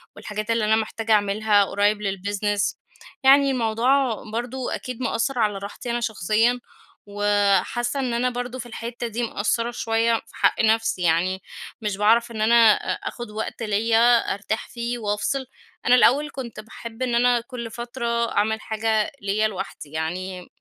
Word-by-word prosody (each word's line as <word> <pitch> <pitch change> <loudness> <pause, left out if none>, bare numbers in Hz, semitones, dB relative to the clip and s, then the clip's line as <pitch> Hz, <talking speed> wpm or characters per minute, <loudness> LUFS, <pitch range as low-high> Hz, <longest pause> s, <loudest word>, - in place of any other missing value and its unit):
والحاجات 215 +1 -4
اللي 230 -2 +1
أنا 220 - +4
محتاجة 220 0 -2
أعملها 205 0 +3
قريب 205 +2 +1
للbusiness 205 +1 -1 0.5
يعني 275 +1 +6
الموضوع 245 +1 +1
برضو 245 +2 -3
أكيد 250 -1 -5
مأثر 245 +1 -1
على 210 -3 +1
راحتي 200 +4 -6
أنا 240 - 0
شخصيًا، 225 +2 +1 0.5
وحاسّة 205 +5 +1
إن 255 -3 -1
أنا 245 +2 +1
برضو 245 +1 -5
في 240 - -6
الحتّة 235 +1 -5
دي 230 +2 -3
مقصرة 230 +2 -1
شويّة 230 0 +1
في 225 - -8
حق - - +2
نفسي، 225 -3 +2
يعني 180 +3 +1 0.4
مش 210 -3 -2
باعرف 230 +3 +3
إن 220 - -4
أنا 225 0 +6
أ - - -4
آخد 240 -3 -8
وقت 220 +2 -5
ليّ 220 +1 +1 0.4
أرتاح 215 +2 -4
فيه 235 0 -3
وأفصل. 215 +5 -1 0.4
أنا 245 - +6
الأوّل 275 +4 +4
كنت 235 -5 -7
باحب 225 +2 -10
إن 245 -2 0
أنا 245 0 +3
كل 235 -2 -7
فترة 240 +1 -6 0.3
أعمل 220 +1 0
حاجة 220 -1 0
ليّ 205 +2 +1
لوحدي، 185 -7 -7
يعني 180 +3 -4
225 Hz, 155 wpm, -23 LUFS, 205-240 Hz, 0.5 s, يعني